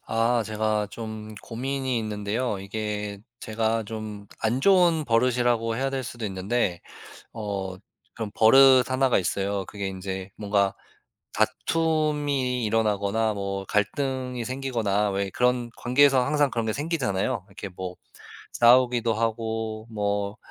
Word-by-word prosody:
아 115 +1 +2
제가 110 -1 -1
좀 110 -1 -7
고민이 130 +1 -2
있는데요. 105 +1 -2
이게 105 0 -4 0.2
제가 110 +1 -1
좀 105 -1 -7
안 115 +3 0
좋은 175 -2 +4
버릇이라고 120 -1 +2
해야 135 +2 -1
될 135 -1 -2
수도 120 -1 -6
있는데 95 -1 -1 0.5
어 100 -3 -4 0.4
그런 110 -3 -4
버릇 130 +3 +6
1 130 +1 +2
가 125 - +3
있어요. 100 +1 -1
그게 100 -2 -5
인제 95 0 -5
뭔가 100 -2 +1 0.6
다툼이 150 -6 0
일어나거나 110 0 +1
뭐 100 -1 -4
갈등이 125 +4 -1
생기거나 115 -6 0
왜 100 0 -1
그런 125 +1 +1
관계에서 130 +1 +4
항상 145 0 +2
그런 115 -3 -2
게 110 - -1
생기잖아요. 140 - -1
이렇게 100 - -8
뭐 90 0 -6 0.6
싸우기도 120 -1 +4
하고 110 0 -2
뭐 100 -1 -2
110 Hz, 265 characters per minute, -25 LUFS, 105-125 Hz, 0.6 s, 버릇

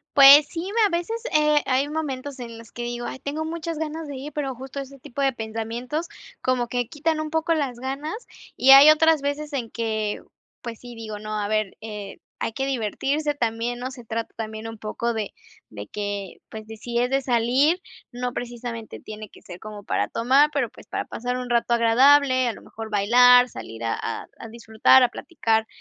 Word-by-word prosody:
Pues 280 +1 +10
sí, 330 - -5
me 460 - +1
a 355 -4 0
veces, 450 +7 -3
eh, 300 -1 +4
hay 265 +2 +1
momentos 285 -3 -4
en 235 -2 -8
los 230 0 -13
que 240 - -6
digo: 240 0 -4
"Ay, - - -6
tengo 290 +4 -4
muchas 330 0 -4
ganas 315 0 -4
de 285 - -7
ir", 280 +3 -7
pero 275 -3 -3
justo 265 +2 -8
ese 275 0 -8
tipo 280 0 -7
de 270 -1 +3
pensamientos, 230 +7 -4 0.3
como 250 -2 0
que 245 0 -1
quitan 315 +1 -1
un 310 0 -3
poco 320 +1 0
las 270 -6 -2
ganas 275 +6 -4 0.4
y 265 - +4
hay 275 +3 +11
otras 315 -1 +4
veces 290 +1 -3
en 245 -5 -3
que, 220 -2 -2 0.4
pues 235 -2 -6
sí, 245 -1 -11
digo: 220 -2 -7
"No, 215 0 -5
a 205 -1 -2
ver, 215 -2 -1
eh, 210 -2 -7 0.2
hay - - -2
que 270 +4 -2
divertirse 275 +4 -1
también", 235 -1 -2
¿no?, 255 +1 -4
se 250 -3 -11
trata 230 0 -4
también 220 0 -6
un 225 -1 -9
poco 230 +2 -3
de 215 -3 -3 0.4
de 105 -1 -8
que, 205 -2 -5
pues, 220 -1 -8
decides 235 +2 -2
de 270 0 +2
salir, 255 +7 +2 0.3
no 245 0 -3
precisamente 240 -2 -6
tiene 215 0 -9
que - - -17
ser 175 -1 -10
como 210 -1 -9
para - - 0
tomar, 270 +6 +3
pero 280 -5 0
pues - - -16
para - - -3
pasar 245 +2 -3
un 250 -1 -5
rato 235 0 +2
agradable, 255 +3 +5
a - - -1
lo - - -12
mejor 225 0 -9
bailar, 245 +4 +6
salir 115 - -9
a 115 - 0 0.4
a 230 - -9
disfrutar, 230 +3 +4
a 250 - +5
platicar 225 -10 -1
245 Hz, 200 wpm, -24 LUFS, 225-285 Hz, 0.4 s, hay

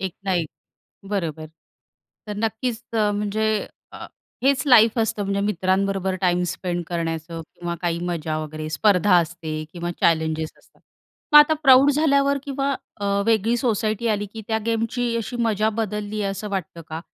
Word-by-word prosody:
एक 190 -2 -4
ना 195 - 0
एक. 165 -3 -1 0.6
बरोबर. 160 -6 -3 0.8
तर 210 - -4
नक्कीच 225 +2 -2
अ, 215 -2 +2
म्हणजे 210 +1 -1 0.5
अ, - - -8 0.4
हेच 275 0 +3
लाईफ 230 -3 +6
असतं 220 -2 0
म्हणजे 200 0 -1
मित्रांबरोबर 190 -1 0
टाईम 180 -1 +2
स्पेंड 175 -1 -3
करण्याचं 165 -1 -3
किंवा 175 0 -4
काही 170 -1 -1
मजा 160 -2 -2
वगैरे 155 0 -6
स्पर्धा 185 +3 +3
असते 165 -1 -4 0.2
किंवा 175 -1 -4
चॅलेंजेस 160 -1 +1
असतात. - - -28 0.5
मग - - +11
आता 295 +1 +6
प्रौढ 265 0 +7
झाल्यावर 280 -1 +2
किंवा 275 0 -2 0.3
अ, 205 - -4 0.2
वेगळी 225 +1 +2
सोसायटी 225 -2 0
आली, 210 -2 0
की 220 +2 -9
त्या 220 - +1
गेमची 230 +1 -1
अशी 230 +2 -4
मजा 215 0 +1
बदलली 210 0 -3
आहे 195 -1 -1
असं 205 +2 -6
वाटतं 185 -4 -4
का 160 +1 -6
205 Hz, 155 wpm, -23 LUFS, 175-225 Hz, 0.8 s, मग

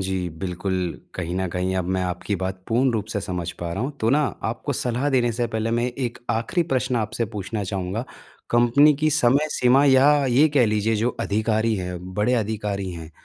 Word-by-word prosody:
जी, 95 -1 -2
बिल्कुल 95 +1 -2 0.4
कहीं 90 -1 -4
न 95 0 0
कहीं 90 +2 -2
अब 95 - 0
मैं 95 - 0
आपकी 90 +3 -2
बात 95 0 -4
पूर्ण 125 +3 +3
रूप 110 -3 -2
से 105 - -1
समझ 90 -3 -4
पा 85 -1 -3
रहा 95 +6 -2
हूँ, 135 - -2
तो 110 - +2
ना 150 +2 +3 0.2
आपको 120 +5 -2
सलाह 125 +2 -1
देने 125 -3 +2
से 120 +1 -1
पहले 110 0 -2
मैं 120 +1 +1
एक 125 -1 -4
आखिरी 115 +10 0
प्रश्न 130 -1 +1
आपसे 115 +1 -1
पूछना 105 +1 -3
चाहूँगा 95 +4 -3 0.5
कंपनी 120 +6 +5
की 155 +2 +1
समय 145 0 +3
सीमा 130 +2 +4
या 135 0 +6 0.2
ये 135 +5 +4
कह 125 -5 +5
लीजिए 110 +1 +1
जो 115 +4 +1
अधिकारी 110 +1 +1
हैं, 90 -1 -4 0.2
बड़े 105 +5 +2
अधिकारी 105 -4 -2
हैं 80 -2 -8
110 Hz, 200 wpm, -23 LUFS, 95-125 Hz, 0.5 s, या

